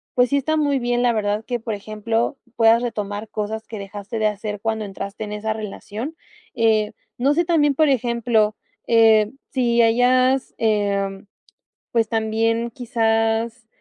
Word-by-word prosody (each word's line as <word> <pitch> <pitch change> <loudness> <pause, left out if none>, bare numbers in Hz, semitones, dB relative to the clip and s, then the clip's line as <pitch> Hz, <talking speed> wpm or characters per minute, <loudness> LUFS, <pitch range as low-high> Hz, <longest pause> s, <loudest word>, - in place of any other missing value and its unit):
pues 250 0 +4
sí, 280 - +1
está 315 +3 0
muy 290 -2 +2
bien, 240 0 0
la 245 -1 +3
verdad 210 0 -1
que 245 -2 -3
por 225 -1 -3
ejemplo, 215 +4 -2 0.2
puedas 225 0 +5
retomar 210 -2 -4
cosas 220 +1 -4
que 220 - -8
dejaste 205 +3 -6
de 215 - +1
hacer 210 0 -4
cuando 220 0 -2
entraste 200 +1 -6
en 210 - -6
esa 215 +1 -2
relación. 220 +7 -6 0.4
Eh, 220 -2 +2 0.3
no 275 +4 +2
sé, 340 +3 +1
también, 295 -4 +3
por 310 +2 +4
ejemplo, 235 -4 +1 0.3
eh, 220 -2 +5 0.2
si 240 -3 +2
hayas, 255 +3 +3
eh, 200 -3 0 0.7
pues, 230 -2 +2
también 225 +1 0
quizás, 225 -1 0
225 Hz, 150 wpm, -22 LUFS, 215-245 Hz, 0.7 s, puedas